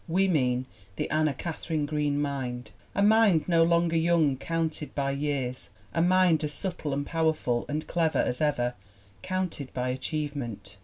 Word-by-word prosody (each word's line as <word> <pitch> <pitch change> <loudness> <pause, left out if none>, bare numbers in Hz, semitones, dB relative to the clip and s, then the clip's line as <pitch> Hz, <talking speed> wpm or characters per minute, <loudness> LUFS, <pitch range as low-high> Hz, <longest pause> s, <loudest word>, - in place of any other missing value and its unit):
We 190 +4 +2
mean 130 -7 +1 0.3
the - - -2
Anna 155 -2 +2
Katharine 160 -1 -3
Green 145 -1 0
Mind, 125 -5 -3 0.2
a 200 - +3
Mind 210 -6 +5
no 170 -2 +4
longer 170 0 +3
young 165 -4 +3
counted 160 +1 -3
by 140 -1 0
years, 140 -3 -2 0.2
a 165 - +1
Mind 180 -2 +4
as 150 -1 -2
subtle 175 -5 -3
and 140 +1 -1
powerful 160 -7 0
and 150 +1 -2
clever 165 -2 +1
as 125 - 0
ever, 125 -5 +1 0.5
counted 185 -7 -3
by 125 0 -1
achieve 150 +3 -3
ment. 105 -7 -6
150 Hz, 160 wpm, -28 LUFS, 135-165 Hz, 0.5 s, Mind